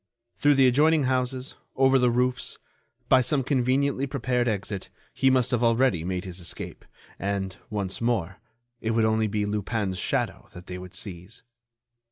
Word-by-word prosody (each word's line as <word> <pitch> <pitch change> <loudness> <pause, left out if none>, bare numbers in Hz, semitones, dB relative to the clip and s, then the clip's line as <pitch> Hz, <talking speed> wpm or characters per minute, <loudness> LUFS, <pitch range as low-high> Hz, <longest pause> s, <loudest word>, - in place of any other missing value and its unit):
Through 145 0 +4
the 135 -1 +5
adjoining 150 +4 +4
houses, 130 0 -1 0.2
over 135 0 +4
the 125 -1 +4
roofs, 125 +1 0 0.5
by 130 0 +6
some 135 +2 +1
conveniently 135 +1 +1
prepared 125 -2 0
exit, 100 -2 -3 0.2
he 135 - +3
must 130 -2 +2
have 120 -1 +1
already 115 -7 +3
made 90 +1 -3
his 90 -1 -7
escape, 85 - -7 0.3
and, 95 -1 -2
once 100 -2 -3
more, 100 -6 -1 0.4
it 115 0 -1
would 115 -1 +3
only 110 0 +2
be 105 0 -1
Lupin's 105 -2 -2
shadow - - -2
that 90 0 -11
they 90 0 -6
would 90 +1 -10
seize. 95 0 -7
115 Hz, 160 wpm, -26 LUFS, 100-130 Hz, 0.5 s, by